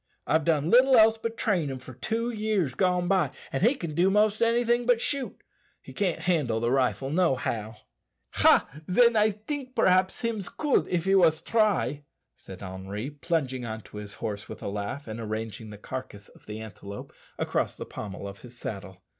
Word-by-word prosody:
I've 160 -1 +2
done 160 -1 +2
little 255 +1 +6
else 220 0 +6
but 230 0 -4
train 180 -9 +1
him 135 - -4
for 130 0 -11
two 230 - -2
years 210 - 0
gone 180 +3 +1
by, 190 0 +2 0.2
and - - -1
he 240 +8 +4
can 170 - -5
do 175 +5 +3
most 210 +2 +2
anything 240 +1 +2
but 245 -2 +4
shoot 275 +1 -2 0.4
he - - -13
can't 190 -5 -1
handle 150 -11 +1
the 120 +1 0
rifle 135 +1 +1
nohow." 130 - 0 0.6
"Ha! - - +5 0.2
then, 235 +5 +5
I 215 0 +5
tink 255 +5 -6
perhaps 185 0 +3
hims 225 -5 -2
could 295 -3 +1
if 175 -1 -1
he 195 - +3
wos 165 -5 +5
try," 195 - +1 0.3
said 95 0 -11
Henri, 95 +7 -5
plunging 140 -4 -2
on 110 -1 -5
to 105 - -12
his 105 -1 -7
horse 105 -2 -5
with - - -8
a - - -2
laugh, 100 +7 -5
and 110 +1 -6
arranging 110 0 -5
the 105 - -9
carcass 105 -3 -7
of - - -21
the 105 +1 -6
antelope 100 -1 -9 0.2
across - - -1
the - - -6
pommel 100 -1 -7
of 100 0 -9
his 120 -1 -12
saddle. 95 -5 -7
160 Hz, 190 wpm, -27 LUFS, -, 0.6 s, little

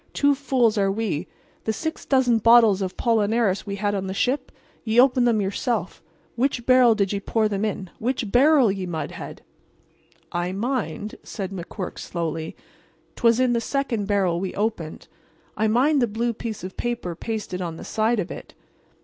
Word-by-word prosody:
"Two 285 0 +3
fools 255 -6 +1
are 195 -1 +2
we. 195 -6 -2 0.4
The 220 - +1
six 320 +9 -5
dozen 250 -4 +3
bottles 225 -3 +6
of 185 -1 -3
'pollinaris 220 -3 +1
we 200 - -3
had 205 0 -1
on 195 -1 -2
the 190 - -4
ship—ye 245 -2 -2
opened 250 -1 +5
them 220 -3 +2
yourself—which 225 - -3
barrel 255 -3 +6
did 200 -2 0
ye 200 - -1
pour 220 +2 +1
them 200 -1 -2
in—which 215 +3 -3
barrel, 270 -3 +5
ye 190 -2 -4
mudhead?" 165 -2 -6 0.9
"I 175 +1 -2
mind," 215 -3 -3
said 195 -1 -6
McQuirk, 185 0 -6
slowly, 165 -2 -4 0.6
"'twas 230 0 +3
in 255 -1 +3
the 235 - +1
second 235 -6 -2
barrel 190 -4 +1
we 190 0 -4
opened. 205 -7 -3 0.5
I 220 - +1
mind 265 +6 +3
the 240 - +3
blue 230 +2 -1
piece 220 -3 -6
of 185 0 -7
paper 240 -7 -3
pasted 210 -1 -4
on 170 -2 -4
the - - -9
side 220 +1 +1
of 180 - -3
it." - - -9
220 Hz, 165 wpm, -24 LUFS, 195-240 Hz, 0.9 s, bottles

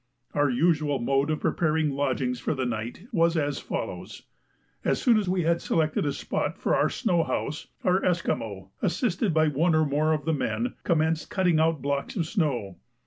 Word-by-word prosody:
Our 145 -1 +2
usual 150 +1 +2
mode 135 +4 +1
of 155 - -1
preparing 155 -2 +1
lodgings 130 -3 -1
for - - -1
the 130 -1 -1
night 120 - -4
was 170 -1 +2
as 145 -2 0
follows: - - -5 0.6
As - - +1
soon 235 -5 +4
as 200 -4 -2
we 185 -1 +1
had 170 +1 +1
selected 155 -2 0
a - - +1
spot - - -3
for - - +1
our - - +2
snow 180 -9 +1
house, 155 0 -3 0.2
our 185 +1 +2
Esquimaux, 105 - -1
assisted 190 +1 0
by 155 0 +3
one 160 +4 +2
or 155 0 +3
more 150 +2 +1
of 150 -2 -2
the 160 - +1
men, 235 - -1
commenced 160 -1 +1
cutting 180 -5 +2
out 160 -3 +1
blocks 140 0 -2
of 170 -6 0
snow. 140 - -1
155 Hz, 185 wpm, -26 LUFS, 140-170 Hz, 0.6 s, soon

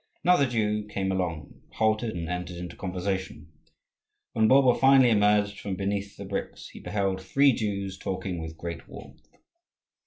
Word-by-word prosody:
Another 175 -6 +4
Jew 105 -3 -1
came 95 -2 -2
along, 90 -5 -4
halted, 110 0 0
and 85 -1 -4
entered 90 0 -4
into 90 0 -7
conversation. 95 -4 -4 0.8
When 110 0 +3
Bulba 130 0 +6
finally 135 -2 +6
emerged 105 -1 +3
from 100 -2 -4
beneath 100 +1 -3
the - - -7
bricks, - - -5
he - - -12
beheld 95 -2 -2
three 135 +8 +3
Jews 100 -3 -3
talking 95 -2 -4
with 80 0 -7
great 85 -1 -7
warmth. - - -13
100 Hz, 150 wpm, -27 LUFS, 90-110 Hz, 0.8 s, Bulba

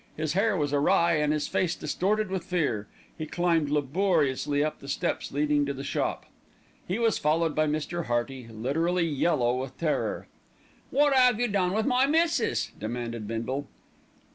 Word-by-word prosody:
His 155 -1 -1
hair 200 +2 +2
was 145 -2 -1
awry 170 +4 +3
and 150 0 +1
his 150 -1 -1
face 175 -2 0
distorted 195 +6 -1
with 190 -2 -2
fear. 140 - -1 0.3
He 155 -2 -5
climbed 165 -3 +1
laboriously 145 -2 +1
up 155 - -3
the 140 - -11
steps 140 - -2
leading 145 0 +1
to 140 - -2
the 135 - -6
shop. - - -2 0.6
He 185 - -1
was 230 -2 +1
followed 160 +1 +1
by 155 +1 +1
Mr. 155 +3 -2
Hearty, 120 +1 -2
literally 160 +11 0
yellow 130 -5 +1
with 130 0 -7
terror. 160 -3 -1 0.6
"Wot 290 0 +3
'ave 250 -3 +5
you 245 - +2
done 190 -4 0
with 220 +1 0
my 260 0 +3
missis?" 315 - +1
demanded 115 0 -4
Bindle. 125 +5 -3
155 Hz, 165 wpm, -27 LUFS, 135-185 Hz, 0.6 s, ave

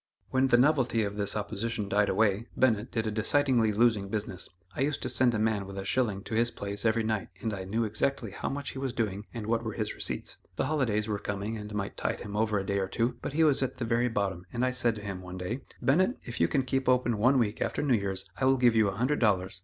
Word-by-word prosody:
When 130 +1 +3
the 120 -2 +5
novelty 130 -4 +3
of 100 0 -3
this 100 -1 0
opposition 105 0 -2
died 100 +1 +2
away, 110 +1 +2
Bennett 120 -2 +2
did 110 -1 -1
a 110 - -1
decidedly 115 +1 +2
losing 105 -2 +2
business. 100 -3 -3 0.3
I - - -3
used 145 +1 0
to 125 - -1
send 120 0 +4
a - - +1
man 105 -2 0
with 100 0 -8
a 95 - -4
shilling 105 -4 0
to - - -7
his 115 +2 +3
place 100 -1 -5
every 110 0 +3
night 110 -2 -1
and 110 +1 -2
I 95 -2 -5
knew 110 +5 0
exactly 110 +1 -1
how - - -4
much 140 0 -4
he 135 - -7
was 135 -2 -2
doing 105 -4 -2
and 115 -3 -6
what 115 +1 0
were 110 - -3
his 105 -2 -2
receipts. - - -3 0.2
The - - 0
holidays 125 -8 0
were 105 -2 -2
coming 105 +2 -3
and 105 -1 -7
might 100 -1 -3
tide - - -2
him 105 0 -6
over 110 0 +1
a 95 - -2
day 100 0 0
or 95 - -1
two, 120 +4 -1
but - - -4
he 160 +2 +3
was 145 -4 +3
at 130 -1 -2
the 120 - -2
very 115 +1 +2
bottom 100 -5 -2
and 120 +2 0
I 130 - +1
said 120 -2 +2
to 105 - -8
him, 95 -2 -5
one 90 0 -8
day: 110 +9 -4 0.2
"Bennett, 185 - +3
if 120 - -6
you 85 - +5
can 135 - +1
keep 130 0 0
open 125 -3 +2
one 130 +5 +4
week 110 -3 0
after - - -1
New 140 -3 +3
Year's 100 -3 -1
I 130 - 0
will 135 0 +4
give 120 -2 +4
you 110 -2 +4
a 95 - -2
hundred 130 +8 +1
dollars." 95 -5 +1
110 Hz, 265 wpm, -29 LUFS, 100-125 Hz, 0.3 s, the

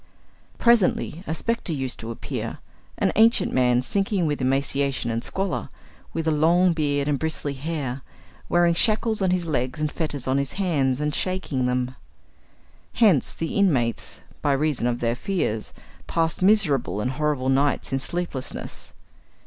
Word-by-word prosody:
Presently 220 -7 +3
a 160 - -1
spectre 230 -4 -1
used 135 -3 -3
to 115 - -6
appear, 115 - -5 0.4
an - - +2
ancient 225 +2 +4
man 125 -1 +3
sinking 195 +3 0
with 145 -3 -1
emaciation 135 -1 0
and 115 +1 -2
squalor, 195 -1 -2 0.4
with 165 -1 -3
a - - +4
long 170 +4 +4
beard 145 -3 0
and 145 -2 +1
bristly 160 -3 -2
hair, 140 -2 -4 0.5
wearing 175 -1 +4
shackles 215 +3 +2
on 190 - +2
his 180 -1 0
legs 130 -3 -1
and 150 -1 -1
fetters 145 -6 -3
on 130 +1 +2
his 140 -1 -3
hands, 145 -9 +1
and 150 0 -1
shaking 170 -10 -1
them. 125 0 -1 1.0
Hence 200 - +4
the 165 - -4
inmates, 135 - 0 0.2
by 145 - +2
reason 140 -3 +1
of 120 0 -1
their 115 0 +1
fears, 125 - -2 0.4
passed 165 +1 0
miserable 180 - +3
and 125 +4 -1
horrible 145 -2 0
nights 140 +1 +1
in 135 - +1
sleeplessness. 140 -1 -4
150 Hz, 150 wpm, -24 LUFS, 130-175 Hz, 1.0 s, ancient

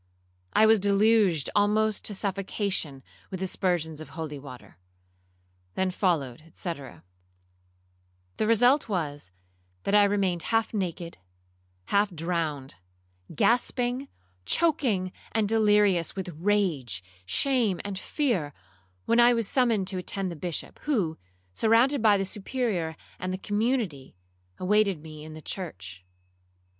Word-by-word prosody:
I 220 - +6
was 220 0 +6
deluged 200 -5 +3
almost 210 +1 +2
to 205 - 0
suffocation 190 -7 -2 0.3
with 190 - -5
aspersions 175 -4 -1
of 155 - -9
holy 150 -3 -5
water. 125 -9 -12 1.0
Then 190 0 0
followed, 155 - 0
&c. 175 - -3
'The 90 - -11
result 245 +4 +4
was, 145 - -3 0.5
that 195 - -1
I 205 0 +7
remained 195 -4 +1
half 225 0 +1
naked, 175 - -4 0.7
half 200 +1 +3
drowned, 160 - -3 0.6
gasping, 245 - +1 0.4
choaking, 230 - +1 0.2
and 220 -2 +2
delirious 210 -5 +3
with 190 -2 -4
rage, 160 - 0 0.2
shame, 235 - +2
and 195 -2 -4
fear, 195 - -1 0.5
when 235 - +3
I 240 0 +6
was 230 -3 0
summoned 230 -7 +2
to 190 -1 -3
attend 190 0 -3
the - - -6
Bishop, 170 +1 -5
who, 200 - 0 0.3
surrounded 230 - +3
by 210 -2 +5
the 195 - -1
Superior 200 -6 -2 0.2
and 185 - -3
the 185 - -2
community, 205 - -1 0.4
awaited 200 -2 +2
me 155 -1 -10
in 155 0 -9
the 155 - -10
church. 95 - -6
190 Hz, 120 wpm, -27 LUFS, 155-215 Hz, 1.0 s, I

